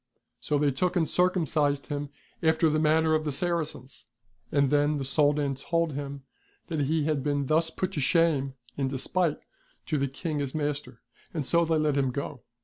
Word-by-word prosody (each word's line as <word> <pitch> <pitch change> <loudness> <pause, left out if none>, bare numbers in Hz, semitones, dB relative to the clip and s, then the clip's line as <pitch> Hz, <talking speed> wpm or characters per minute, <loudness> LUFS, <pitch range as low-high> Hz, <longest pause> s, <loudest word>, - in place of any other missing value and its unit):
So 150 - 0
they 145 0 +2
took 180 +7 0
and 165 -3 +2
circumcised 155 -6 +1
him 145 -1 -4 0.3
after 160 0 +3
the 155 - +1
manner 160 +1 +3
of 155 0 +2
the 150 - -2
Saracens. 155 -4 -3 0.4
And 140 -2 +2
then 145 +1 +3
the 135 - -3
Soldan 145 0 +2
told 165 +4 -1
him 140 0 -5 0.5
that 160 -3 -2
he 155 +2 +1
had 150 -2 0
been 145 0 0
thus 160 +3 +2
put 185 +2 -3
to - - -3
shame 140 -3 +2 0.2
in 135 -1 -1
despite 150 +5 0 0.5
to 155 -3 0
the 140 - +1
King 150 +3 -4
his 140 -1 -3
master. 145 -1 -3 0.3
And 150 -4 -1
so 170 +5 +3
they 165 0 +1
let 150 -2 +1
him 135 -2 +2
go. 140 0 -5
150 Hz, 185 wpm, -28 LUFS, 140-160 Hz, 0.5 s, after